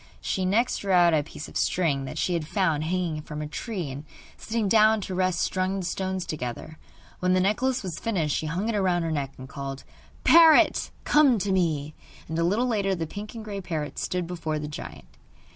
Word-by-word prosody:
She 190 - -2
next 225 +7 +2
drew 200 - -3
out 175 -2 +5
a 155 - +3
piece 150 0 -9
of - - -14
string 145 -7 +1
that - - -7
she 180 - 0
had 165 -3 -2
found 165 -6 0
hanging 170 -3 -1
from 150 0 -7
a 150 - -3
tree, 175 - -4
and 140 +2 -7 0.3
sitting 220 -1 -2
down 215 +1 +5
to 190 - -5
rest 185 -1 +1
strung 185 +1 0
the 185 - -4
stones 190 0 -2
together. 155 +2 -6 0.4
When 180 0 +2
the - - +3
necklace 240 +6 +1
was 175 -3 -5
finished 170 -10 -1
she 155 - -2
hung 180 +7 -2
it 230 - 0
round 180 -4 +1
her 165 - -1
neck, 140 -3 -2
and 130 - -9
called: 135 0 -6 0.4
'Parrot, 325 -2 +6
come 285 -5 +5
to 200 0 -1
me!' 155 -5 0 0.3
And 160 +1 -3
a - - +2
little 205 +8 +2
later 200 -5 0
the 165 -2 -3
pink 205 +7 -8
and 220 -1 -7
grey 200 -2 -5
parrot 160 -4 -4
stood 180 -1 -2
before 165 -3 -3
the 150 0 -4
giant. 150 - -8
180 Hz, 210 wpm, -26 LUFS, 155-200 Hz, 0.4 s, Parrot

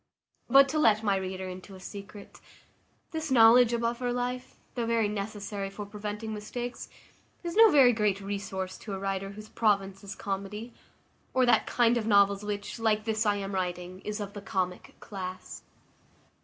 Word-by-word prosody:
But 275 +2 +7
to 310 +2 0
let 220 -6 +4
my 200 -2 +2
reader 190 0 -4
into 185 +1 -9
a - - -11
secret, 200 +1 -10 0.7
this 320 -2 -3
knowledge 240 -1 +7
of 235 0 -1
upper 240 +1 -1
life, 245 +1 -3 0.2
though 235 -2 -2
very 230 -2 +2
necessary 205 -1 -4
for 205 +1 -7
preventing 210 +1 -5
mistakes, 240 +4 -6 0.5
is 340 -1 -4
no 445 +1 +8
very 265 -7 +6
great 210 -3 +1
resource 195 -2 -4
to 205 - -7
a - - -5
writer 195 0 -2
whose 215 +1 -11
province 195 -3 0
is 200 - -7
comedy, 205 +3 -5 0.6
or 260 -1 +4
that 245 - +3
kind 240 0 +3
of 220 -2 -2
novels 200 -1 +4
which, 205 +1 -4
like 215 -1 +1
this 220 0 0
I 205 - +3
am 200 0 -4
writing, 180 0 -3
is 210 +2 -5
of 200 -1 -5
the 205 - -7
comic 185 -2 -3
class. 185 -3 -7
210 Hz, 170 wpm, -29 LUFS, 195-230 Hz, 0.7 s, no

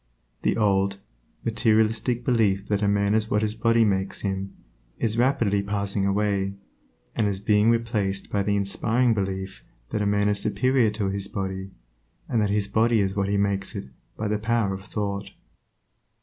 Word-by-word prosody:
The - - +1
old, 100 -2 +2 0.5
materialistic 110 +2 +1
belief 105 -5 +2
that 105 -1 +1
a 100 - +2
man 100 0 +2
is 110 0 +1
what 105 +1 +1
his 105 0 0
body 115 +1 +3
makes 95 -2 -1
him, 95 -1 -3 0.5
is 110 -2 0
rapidly 115 -5 +2
passing 100 0 -1
away, 100 -1 0 0.6
and 105 - +1
is 100 -1 -2
being 105 +1 +3
replaced 110 -4 -1
by 100 - +1
the 100 +1 +1
inspiring 115 +5 +1
belief 95 -2 -3 0.3
that 105 - 0
man 100 0 +2
is 105 -1 +1
superior 130 +1 +2
to 105 -2 -2
his 100 0 -3
body, 95 -1 -4 0.6
and 115 - +1
that 105 - +1
his 100 0 0
body 115 +1 +2
is 95 -1 0
what 100 -1 0
he 100 - +1
makes 100 -1 -1
it 65 - -6 0.3
by 105 - -2
the 105 0 0
power 110 -2 +1
of 95 +1 -7
thought. 100 -2 -3
105 Hz, 170 wpm, -25 LUFS, 100-110 Hz, 0.6 s, body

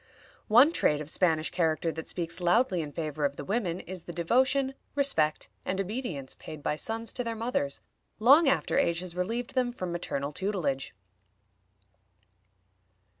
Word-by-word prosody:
One 250 +8 +7
trait 150 - +2
of 150 0 -4
Spanish 160 -3 +2
character 165 -1 +1
that 160 0 -7
speaks 170 0 -2
loudly 180 +1 +3
in 150 -2 -6
favor 155 -1 -4
of 140 0 +1
the - - -7
women 190 -4 -1
is 185 -2 -6
the - - -6
devotion, 260 - +2 0.2
respect, 160 - +2 0.2
and 190 - -2
obedience 195 - -3
paid 155 -2 -10
by - - 0
sons 225 +7 -3
to 245 - -2
their 230 -1 -3
mothers 220 - -2 0.4
long 275 +7 +6
after 270 - +1
age 170 -10 +1
has 180 -2 -7
relieved 230 +7 -2
them 250 -2 +1
from 185 -7 -5
maternal 145 -5 -3
tutelage. 150 - -2
180 Hz, 155 wpm, -29 LUFS, 155-235 Hz, 0.4 s, One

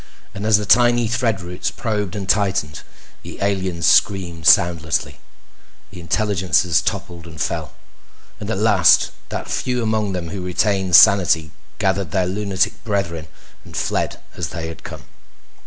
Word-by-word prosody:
And 100 +2 -5
as 110 -2 +5
the 105 - -4
tiny 120 +3 +4
thread 115 -4 -1
roots 90 0 -4
probed 105 -4 -3
and 100 -2 -5
tightened, 95 -6 0 0.4
the - - -10
aliens 95 -4 -1
screamed 85 -5 +2
soundlessly. 85 -5 +2 0.7
The 95 - -11
intelligences 90 -1 +1
toppled 90 -5 -5
and 80 -2 -12
fell, - - -3 0.7
and 105 - -7
at 110 - -1
last 105 -4 +4 0.2
that - - -5
few 125 -1 -2
among 110 -3 -1
them 85 -2 -4
who 95 +1 -6
retained 95 0 0
sanity 85 -5 +5 0.3
gathered 95 -3 -1
their 90 +4 0
lunatic 95 0 -2
brethren 85 -7 -3 0.4
and - - -10
fled - - -2 0.2
as - - -3
they 80 0 -6
had 80 - -11
come. - - -9
95 Hz, 145 wpm, -20 LUFS, 85-105 Hz, 0.7 s, as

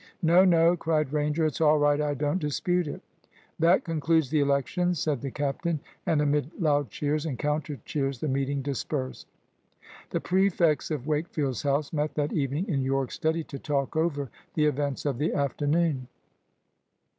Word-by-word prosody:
"No, 170 +3 +6
no!" 170 -2 +5
cried 155 -4 0
Ranger. 150 +2 +1
"It's 155 0 -2
all 155 -1 +5
right. 145 0 +3
I 145 -1 0
don't 145 +5 0
dispute 175 +3 0
it." - - -6 0.6
"That 170 +3 +4
concludes 160 -3 +1
the 155 - +3
elections," 145 +6 +1
said 145 -4 -1
the 140 - -3
captain. 145 +4 -2 0.3
And 150 -2 +3
amid 150 +3 -1
loud 145 -4 +2
cheers 150 +1 -1
and 135 -5 -3
counter 150 -2 -2
cheers 135 -3 -2
the 155 - -2
meeting 135 0 -1
dispersed. 135 -1 -3 0.8
The - - -1
prefects 175 -5 +2
of 150 -5 -3
Wakefield's 150 -4 -1
house 140 +1 0
met 150 0 -1
that 150 -1 -1
evening 145 - -1
in 145 -9 0
Yorke's 135 0 -1
study 160 +1 0
to 140 -2 -8
talk 140 -1 -2
over 145 -6 0 0.2
the 150 - +3
events 145 -2 -1
of 135 -4 -1
the 150 - 0
afternoon. 145 0 0
150 Hz, 165 wpm, -27 LUFS, 140-160 Hz, 0.8 s, No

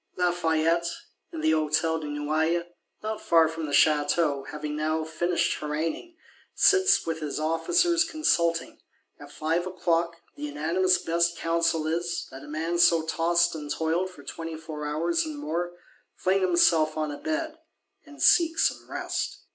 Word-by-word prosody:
Lafayette, 170 -1 +1 0.4
in 160 - -6
the 155 0 +3
Hôtel 155 +1 +1
de 150 - -5
Noailles, 155 +3 0 0.4
not 215 0 -4
far 165 -1 +4
from 160 0 -5
the - - -5
Château, 145 -1 +2
having 150 0 -5
now 155 +1 -1
finished 170 +3 -1
haranguing, 160 - -4 0.4
sits 390 0 +4
with 165 -1 -3
his 150 -1 -4
Officers 335 - +2
consulting: 170 - 0 0.4
at 145 0 -12
five 165 +4 -1
o'clock 170 -2 0 0.2
the - - -13
unanimous 160 +6 +1
best 170 0 0
counsel 165 -1 0
is, 170 +2 -2
that 135 - -10
a - - -11
man 165 +3 -2
so 170 -2 +5
tost 170 +1 +2
and 150 -2 -7
toiled 165 +4 0
for 165 -6 -14
twenty 165 +3 -6
four 155 -2 -6
hours 165 +3 0
and 155 -2 -6
more, 170 +4 -3 0.4
fling 190 +1 +1
himself 170 -4 +3
on 155 -1 -1
a 145 - -6
bed, 320 0 -3 0.4
and 295 -2 -8
seek 330 -1 +5
some - - 0
rest. - - -4
165 Hz, 155 wpm, -26 LUFS, 155-175 Hz, 0.4 s, so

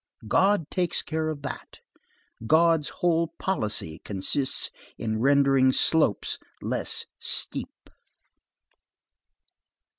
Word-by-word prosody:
God 190 - +2
takes 180 -2 0
care 160 0 -2
of 145 -2 -6
that. 140 - -8 0.7
God's 160 0 +3
whole 170 -1 -1
policy 105 - -3
consists 105 +7 +1 0.3
in 110 -1 -3
rendering 135 0 +4
slopes 150 - +2 0.2
less - - -3
steep. - - -1
145 Hz, 85 wpm, -26 LUFS, 125-165 Hz, 0.7 s, rendering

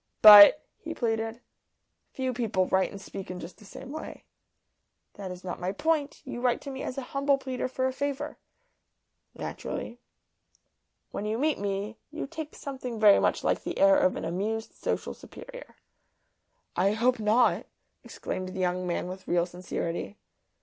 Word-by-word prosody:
"But," 210 +7 +11
he 325 0 -6
pleaded, 225 0 -2 0.7
"few 260 -1 -2
people 220 -6 0
write 190 +1 +2
and 200 - -9
speak 195 0 -8
in 180 0 -5
just 170 +1 -9
the 210 - -15
same 255 +6 -10
way." 315 +1 -7 0.9
"That 195 -2 -7
is 180 0 -8
not 180 - -5
my 180 +1 -2
point. 300 +5 -1
You 245 -2 -6
write 245 -1 +2
to 280 - -7
me 265 0 -6
as 255 - -5
a 270 - -3
humble 280 0 +2
pleader 260 -2 -3
for 260 0 -2
a 260 - 0
favour." 285 +2 -3 1.0
"Naturally." 240 - -6 1.1
"When 210 - -4
you 220 +1 -1
meet 300 +4 +1
me, 200 +2 -3
you 305 +1 -5
take 315 +1 -7
something 255 -4 -6
very 210 -2 +7
much - - +1
like - - +1
the - - -5
air 295 0 +6
of 280 -1 +2
an - - -4
amused 210 +7 -3
social - - -3
superior." - - -12 1.0
"I 195 +3 +2
hope 240 +2 +2
not!" 220 +3 +3 0.4
exclaimed 185 0 -5
the - - -4
young 180 0 0
man 175 0 -2
with 185 +1 -8
real 175 0 +2
sincerity. 175 +2 -5
225 Hz, 165 wpm, -28 LUFS, 190-275 Hz, 1.1 s, But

